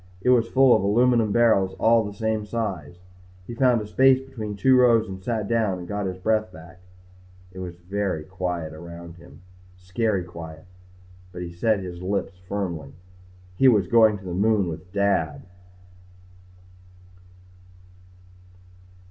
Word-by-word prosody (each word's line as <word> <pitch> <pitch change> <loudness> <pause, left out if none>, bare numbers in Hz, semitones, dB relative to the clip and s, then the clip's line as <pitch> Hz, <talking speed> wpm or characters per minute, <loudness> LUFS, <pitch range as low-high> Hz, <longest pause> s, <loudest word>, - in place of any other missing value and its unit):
It 125 +7 +2
was 115 -2 +3
full 135 -2 +5
of - - +1
aluminum 115 +2 +2
barrels 100 -5 +3
all 115 +1 +4
the 105 -1 -7
same 110 -1 -1
size. 100 -8 -4 0.5
He 120 - -8
found 125 -1 +2
a - - -6
space 130 +4 +4
between 115 -6 -7
two 130 +6 +3
rows 120 -3 +4
and 95 -1 -8
sat 110 -2 -2
down 110 -5 0
and 90 -1 -9
got 100 0 -3
his 90 0 -5
breath 110 +1 0
back. 85 +2 -14 0.7
It 95 - -11
was 90 -2 -6
very 90 -2 -3
quiet 90 -3 -4
around 85 +1 -10
him. 85 0 -16 0.4
Scary 95 +2 -1
quiet. 80 -2 -10 0.7
But 90 0 -7
he 85 -1 -8
set 105 +3 0
his 90 -1 -8
lips 95 0 -3
firmly. 85 -8 -4 0.6
He 135 - +6
was 105 -7 +4
going 110 +1 +4
to 95 - -14
the 90 - -5
moon 100 0 +2
with 85 +3 -8
Dad. 100 -6 0
100 Hz, 150 wpm, -24 LUFS, 90-110 Hz, 0.7 s, He